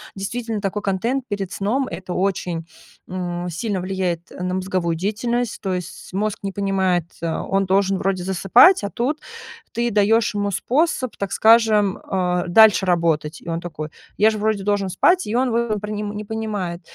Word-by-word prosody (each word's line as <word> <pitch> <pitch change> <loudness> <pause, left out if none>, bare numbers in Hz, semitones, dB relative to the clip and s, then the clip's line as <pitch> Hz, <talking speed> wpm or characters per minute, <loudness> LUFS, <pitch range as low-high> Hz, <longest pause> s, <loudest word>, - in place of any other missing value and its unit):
действительно, 220 +3 -3
такой 200 +1 -2
контент 230 +8 -1
перед 195 -2 -3
сном- 245 +7 0
это 180 +1 -7
очень, 180 -3 -1 0.4
м, 175 -1 -4
сильно 195 +3 -2
влияет 180 -2 -3
на 180 0 -2
мозговую 185 -3 -1
деятельность. 230 +5 -2
То 190 -2 -2
есть 180 +1 -6
мозг 205 +2 -2
не 195 - -2
понимает, 190 -3 0 0.2
э, 165 -1 -1
он 195 +3 0
должен 195 0 +2
вроде 185 -1 -1
засыпать, 195 - +5
а 200 - -2
тут 265 +8 -2 0.5
ты 235 0 -1
даешь 215 +2 +3
ему 205 0 -1
способ, 255 - 0
так 200 -1 -3
скажем, 220 -3 +4
а, 180 -1 -1
дальше 205 0 +6
работать. 165 -3 +1
И - - -16
он 165 0 -2
такой: 155 -3 -6 0.3
"Я 220 +1 +5
же 215 - -4
вроде 215 -1 0
должен 200 -1 0
спать". 360 - +3
И 215 - -2
он 255 0 +2
выв 235 -1 0
не 210 - -3
пр 210 - -6
не 210 0 -4
понимает. 205 -5 -4
195 Hz, 175 wpm, -21 LUFS, 180-220 Hz, 0.5 s, дальше